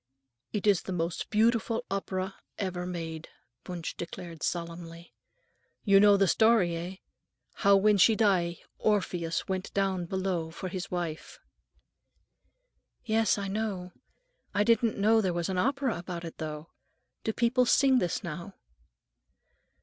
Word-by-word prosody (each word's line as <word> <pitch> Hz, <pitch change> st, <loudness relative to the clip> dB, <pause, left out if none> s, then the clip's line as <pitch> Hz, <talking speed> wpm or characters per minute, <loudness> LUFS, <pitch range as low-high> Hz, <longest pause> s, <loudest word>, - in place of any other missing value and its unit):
"It 210 Hz, -2 st, -3 dB
is 200 Hz, -4 st, +4 dB
the -, -, -6 dB
most 170 Hz, -1 st, -2 dB
beautiful 230 Hz, +2 st, +2 dB
opera 190 Hz, -1 st, -2 dB, 0.2 s
ever 180 Hz, -2 st, -3 dB
made," 165 Hz, -2 st, -5 dB, 0.4 s
Wunsch 175 Hz, -3 st, -4 dB
declared 170 Hz, -1 st, -8 dB
solemnly. 170 Hz, 0 st, -5 dB, 0.7 s
"You 195 Hz, -2 st, +6 dB
know 205 Hz, 0 st, +6 dB
the 195 Hz, -1 st, +3 dB
story, 220 Hz, -5 st, +4 dB
eh? 175 Hz, +3 st, -5 dB, 0.7 s
How, 200 Hz, -2 st, +6 dB
when 205 Hz, +1 st, +4 dB
she 220 Hz, +4 st, +6 dB
die, 185 Hz, -6 st, +2 dB, 0.2 s
Orpheus 180 Hz, -5 st, 0 dB
went 190 Hz, 0 st, -3 dB
down 190 Hz, -3 st, 0 dB
below 185 Hz, -3 st, -2 dB
for 185 Hz, +3 st, -6 dB
his 185 Hz, 0 st, -5 dB
wife?" 170 Hz, -3 st, -4 dB, 0.4 s
"Oh, -, -, -36 dB, 1.3 s
yes, 220 Hz, -1 st, +2 dB
I 200 Hz, -1 st, -3 dB
know. 195 Hz, -3 st, -3 dB, 0.6 s
I 205 Hz, -, +4 dB
didn't 230 Hz, 0 st, +2 dB
know 220 Hz, +2 st, +4 dB
there 185 Hz, -4 st, 0 dB
was 170 Hz, 0 st, -2 dB
an 185 Hz, -1 st, -1 dB
opera 265 Hz, -2 st, 0 dB
about 175 Hz, -1 st, -6 dB
it, 165 Hz, -, -9 dB
though. 155 Hz, 0 st, -6 dB, 0.5 s
Do 220 Hz, -, 0 dB
people 245 Hz, +2 st, +2 dB
sing 265 Hz, -1 st, +5 dB
this 175 Hz, -, -1 dB
now?" 170 Hz, +4 st, -6 dB
190 Hz, 140 wpm, -29 LUFS, 170-215 Hz, 1.3 s, You